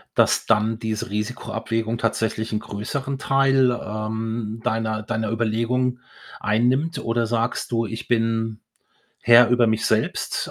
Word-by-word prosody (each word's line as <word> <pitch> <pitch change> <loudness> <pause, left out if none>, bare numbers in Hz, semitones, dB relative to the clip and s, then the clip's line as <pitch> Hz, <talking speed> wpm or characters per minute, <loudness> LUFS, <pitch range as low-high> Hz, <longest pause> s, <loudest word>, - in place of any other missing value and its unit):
dass - - +3
dann 110 0 +2
diese 110 -3 -3
Risikoabwägung 115 +1 -3
tatsächlich 110 0 -1
'nen 105 - 0
größeren 130 +7 -4
Teil, 135 -1 +3
ähm, 110 0 -4
deiner 110 -2 -1
deiner 110 -1 -2
Überlegung 115 +3 0 0.4
einnimmt? 125 +10 +1
Oder 115 0 0
sagst 115 +2 -1
du: 115 -1 +1
„Ich 115 +3 -6
bin 115 -2 0 0.6
Herr 120 +1 +7
über 125 -1 +4
mich 110 0 0
selbst 110 0 -1
115 Hz, 125 wpm, -23 LUFS, 110-120 Hz, 0.6 s, Herr